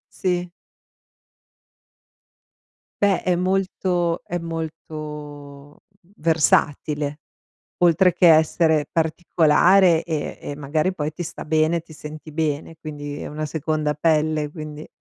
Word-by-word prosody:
Sì. 180 Hz, -1 st, -1 dB, 2.5 s
Beh 200 Hz, -2 st, +3 dB
è 180 Hz, -1 st, +2 dB
molto 180 Hz, -2 st, 0 dB
è 175 Hz, -, -3 dB
molto, 165 Hz, -1 st, -6 dB
uhm, 145 Hz, -1 st, -9 dB, 0.4 s
versatile. 150 Hz, -2 st, +1 dB, 0.6 s
Oltre 175 Hz, +2 st, +5 dB
che 180 Hz, -, +4 dB
essere 160 Hz, -1 st, +3 dB
particolare 165 Hz, +2 st, +3 dB
e 160 Hz, -3 st, -3 dB
e 145 Hz, -, -6 dB
magari 155 Hz, +5 st, -1 dB
poi 150 Hz, -2 st, -3 dB
ti 175 Hz, +3 st, -6 dB
sta -, -, -7 dB
bene, 160 Hz, +2 st, +2 dB
ti 160 Hz, -1 st, -15 dB
senti 155 Hz, +1 st, -9 dB
bene, 155 Hz, 0 st, -2 dB
quindi 145 Hz, -2 st, -7 dB
è -, -, -5 dB
una 155 Hz, +1 st, -4 dB
seconda 155 Hz, 0 st, -1 dB
pelle; 155 Hz, -1 st, +1 dB
quindi, 155 Hz, -1 st, -8 dB
155 Hz, 110 wpm, -22 LUFS, 150-170 Hz, 2.5 s, Oltre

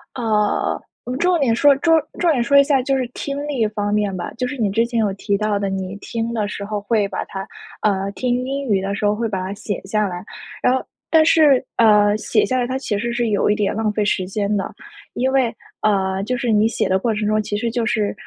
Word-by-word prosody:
呃， 215 Hz, -4 st, 0 dB, 0.4 s
重 355 Hz, -1 st, +2 dB
点 245 Hz, -6 st, +2 dB
说 285 Hz, +3 st, +5 dB
重 325 Hz, +2 st, +4 dB, 0.2 s
重 345 Hz, -2 st, +3 dB
点 260 Hz, -6 st, +1 dB
说 280 Hz, +4 st, +4 dB
一 280 Hz, -, +8 dB
下 275 Hz, -2 st, +2 dB
就 270 Hz, +1 st, 0 dB
是 255 Hz, -, -1 dB
听 280 Hz, 0 st, -4 dB
力 250 Hz, -7 st, 0 dB
方 205 Hz, -1 st, -2 dB
面 205 Hz, -2 st, 0 dB
吧， 175 Hz, -, -5 dB
就 250 Hz, -, -1 dB
是 285 Hz, -, -5 dB
你 220 Hz, -4 st, +1 dB
之 230 Hz, +3 st, +2 dB
前 235 Hz, -1 st, -2 dB
有 210 Hz, -3 st, +1 dB
提 200 Hz, +1 st, -1 dB
到 210 Hz, -1 st, 0 dB
的， 200 Hz, -, -1 dB
你 190 Hz, 0 st, -4 dB
听 230 Hz, +2 st, -4 dB
的 210 Hz, -3 st, -1 dB
时 205 Hz, -, -6 dB
候 210 Hz, 0 st, -3 dB
会 205 Hz, -1 st, +1 dB
把 -, -, -4 dB
它 195 Hz, 0 st, -7 dB, 0.3 s
呃， 200 Hz, -1 st, 0 dB
听 250 Hz, +2 st, -1 dB
英 275 Hz, +1 st, -3 dB
语 200 Hz, -4 st, +2 dB
的 195 Hz, +1 st, -2 dB
时 210 Hz, -, -2 dB
候 205 Hz, 0 st, +2 dB
会 230 Hz, +2 st, -1 dB
把 195 Hz, -3 st, -2 dB
它 190 Hz, +1 st, -4 dB
写 205 Hz, 0 st, -4 dB
下 210 Hz, +1 st, 0 dB
来。 180 Hz, 0 st, -6 dB, 0.4 s
然 250 Hz, -, +3 dB
后 260 Hz, -, -2 dB, 0.3 s
但 320 Hz, -1 st, +5 dB
是， 300 Hz, -5 st, +5 dB
呃， 210 Hz, -2 st, +5 dB
写 -, -, +1 dB
下 255 Hz, -1 st, 0 dB
来， 245 Hz, -, 0 dB
它 260 Hz, +1 st, -2 dB
其 215 Hz, -6 st, -2 dB
实 235 Hz, +3 st, -2 dB
是 240 Hz, -1 st, 0 dB
有 205 Hz, 0 st, +1 dB
一 210 Hz, -, +3 dB
点 210 Hz, -2 st, 0 dB
浪 220 Hz, -1 st, 0 dB
费 210 Hz, -, 0 dB
时 190 Hz, -2 st, 0 dB
间 205 Hz, +1 st, -1 dB
的。 195 Hz, -, -3 dB, 0.4 s
因 260 Hz, +2 st, 0 dB
为， 260 Hz, -4 st, +2 dB, 0.3 s
呃， 195 Hz, -2 st, +1 dB
就 250 Hz, +4 st, -1 dB
是 240 Hz, -1 st, -1 dB
你 215 Hz, 0 st, +4 dB
写 225 Hz, -, -1 dB
的 190 Hz, -, +3 dB
过 230 Hz, +2 st, 0 dB
程 210 Hz, 0 st, -2 dB
中， 215 Hz, 0 st, +2 dB
其 205 Hz, 0 st, -4 dB
实 230 Hz, +1 st, -2 dB
就 235 Hz, -1 st, -1 dB
是， 215 Hz, -3 st, 0 dB
215 Hz, 270 characters per minute, -20 LUFS, 205-250 Hz, 0.4 s, 一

